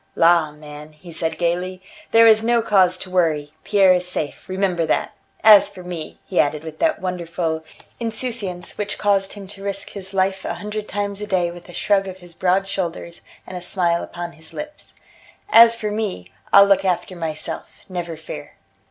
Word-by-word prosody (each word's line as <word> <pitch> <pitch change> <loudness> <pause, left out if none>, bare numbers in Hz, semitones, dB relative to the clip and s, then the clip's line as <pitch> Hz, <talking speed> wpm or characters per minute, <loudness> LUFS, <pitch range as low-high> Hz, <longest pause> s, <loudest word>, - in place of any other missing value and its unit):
"La, 165 -2 +4
man," 150 0 -11
he 170 +3 -13
said 160 0 -3
gaily, 180 +2 -1 0.3
"there 230 0 +6
was 220 -1 +7
no 235 +1 +3
cause 185 -4 +4
to 185 - -7
worry. 155 -5 +1
Pierre 195 -3 +5
is 180 0 0
safe, 160 -3 -4
remember 185 -2 0
that! 160 - 0 0.3
As 215 -2 +8
for 185 - -11
me," 175 -3 -7
he 185 - -1
added 150 +1 +1
with 160 -1 -9
that 320 - +2
wonderful 170 -3 -3 0.4
insouciance 220 -7 -4
which 205 -1 -2
caused 195 -1 +1
him 205 -2 -9
to 200 -1 -11
risk 200 0 -4
his 190 -2 -7
life 190 0 0
a - - -3
hundred 210 +3 -5
times 205 0 -3
a 210 - -4
day 180 -3 +1
with 175 +1 -12
a - - -10
shrug 195 +2 +1
of 190 -1 -7
his 175 -2 -8
broad 185 +3 +1
shoulders 170 -3 -4 0.2
and 185 - -9
a 180 - -5
smile 175 -1 0
upon 175 0 -6
his 160 -1 -12
lips; 300 0 -8 0.6
"as 230 - +8
for 215 -2 -3
me, 210 - -3 0.3
I'll 200 0 +9
look 195 -1 +3
after 180 0 -1
myself, 160 -3 -6
never 175 -3 -5
fear." 160 - -9
185 Hz, 185 wpm, -21 LUFS, 170-200 Hz, 0.6 s, I'll